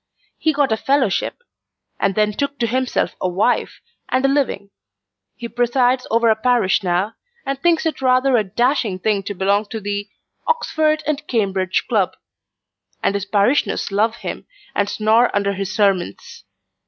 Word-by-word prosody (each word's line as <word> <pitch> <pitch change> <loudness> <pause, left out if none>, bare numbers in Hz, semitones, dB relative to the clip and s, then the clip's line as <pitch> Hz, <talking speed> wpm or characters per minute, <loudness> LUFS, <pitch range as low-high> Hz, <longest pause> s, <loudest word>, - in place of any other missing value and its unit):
He 315 - +2
got 285 -4 +1
a 220 - +2
fellowship: 270 - 0 0.6
and 195 - +1
then 210 0 +2
took 280 +5 -2
to 240 - 0
himself 255 +2 -1
a 185 - +1
wife, 200 +7 0 0.3
and 260 +1 +1
a - - +6
living. 265 -8 -1 0.6
He 235 - -6
presides 245 +2 +1
over 230 +1 +3
a - - +3
parish 230 -4 +2
now, 185 +3 0 0.3
and 275 0 -3
thinks 340 -2 +2
it 320 -4 -2
rather 255 0 +3
a 220 - +3
dashing 230 0 0
thing 205 +1 0
to 200 +1 -6
belong 200 +3 +1
to 220 - -5
the 205 0 -4 0.4
'Oxford 310 -10 +1
and 300 0 -2
Cambridge 195 -5 0
Club;' 205 -6 0 0.9
and - - +2
his 200 0 -2
parishioners 205 +4 +1
love 220 +3 +1
him, - - -7 0.3
and 205 0 0
snore 220 +3 +3
under 200 0 +1
his 195 0 -4
sermons. 195 - -1
220 Hz, 160 wpm, -20 LUFS, 200-260 Hz, 0.9 s, a